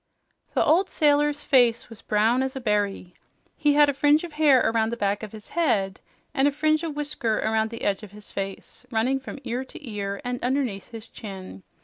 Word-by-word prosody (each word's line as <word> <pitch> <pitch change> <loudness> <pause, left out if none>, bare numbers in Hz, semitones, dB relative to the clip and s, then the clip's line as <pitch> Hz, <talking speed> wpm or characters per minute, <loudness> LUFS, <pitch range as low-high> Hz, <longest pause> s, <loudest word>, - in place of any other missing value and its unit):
The - - +3
old 370 +5 +3
sailor's 295 -1 +2
face 240 -4 +3
was 225 -3 -12
brown 220 +4 +2
as 265 +1 -2
a - - -3
berry. 205 -6 -1 0.4
He 295 -1 +2
had 295 0 +6
a 285 - +1
fringe 290 +3 +3
of 340 -3 -7
hair 300 -4 +5
around 225 0 +1
the 235 - -3
back 200 -1 0
of 215 -2 -7
his 215 -1 -12
head 210 - 0 0.3
and 275 -1 +3
a - - +2
fringe 310 +2 +1
of 325 -3 -4
whisker 290 -7 -1
around 220 0 0
the 230 +1 -8
edge 200 0 0
of 210 - -10
his 210 0 -11
face, 195 +4 -6
running 250 +3 +1
from 265 - -8
ear 245 +3 -3
to 295 +1 -11
ear 200 -2 -4
and 245 0 -3
underneath 250 -7 -1
his 225 -1 -9
chin. 195 -2 -9
240 Hz, 210 wpm, -25 LUFS, 210-290 Hz, 0.4 s, had